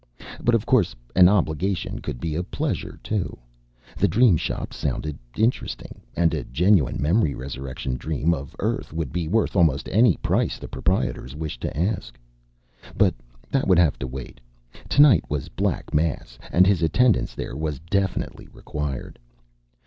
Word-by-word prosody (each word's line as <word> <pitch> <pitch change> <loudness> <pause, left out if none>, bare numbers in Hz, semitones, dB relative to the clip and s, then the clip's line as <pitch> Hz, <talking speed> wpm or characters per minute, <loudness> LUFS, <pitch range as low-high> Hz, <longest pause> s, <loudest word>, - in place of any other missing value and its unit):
But 120 0 +4
of 115 -1 0
course, 110 -9 +2 0.2
an 90 -1 +8
obligation 95 -1 0
could 60 - -5
be 80 +2 -3
a 80 - -1
pleasure, 90 - -3
too. 105 -4 -2 0.6
The - - +3
Dream 115 -4 +5
Shop - - -3
sounded 75 -2 -3 0.2
interesting. 115 +4 -1
And 85 -1 +2
a 75 -5 -2
genuine 85 +2 +2
memory 80 +1 +2
resurrection 65 -1 -5
dream 80 +3 0
of 70 -4 -6
Earth - - -2
would 80 -5 -3
be 85 -3 -1
worth 110 +6 +1
almost 80 -7 +3
any 110 -2 +4
price - - 0
the - - -8
proprietors 65 +3 -1
wished 80 -1 -5
to - - -4
ask. 80 - -2 0.8
But - - +4 0.4
that 135 - +1
would 95 -3 +5
have 85 -4 +3
to 65 - -3
wait. 65 -1 -8 0.5
Tonight 140 - +6
was 70 -2 -3
Black - - -2
Mass, 75 -6 -1
and 90 +2 +5
his 95 -2 +3
attendance 115 +7 +2
there - - -5
was 75 -1 -2
definitely 100 -1 -1
required. 75 -3 -5
80 Hz, 155 wpm, -24 LUFS, 70-100 Hz, 0.8 s, an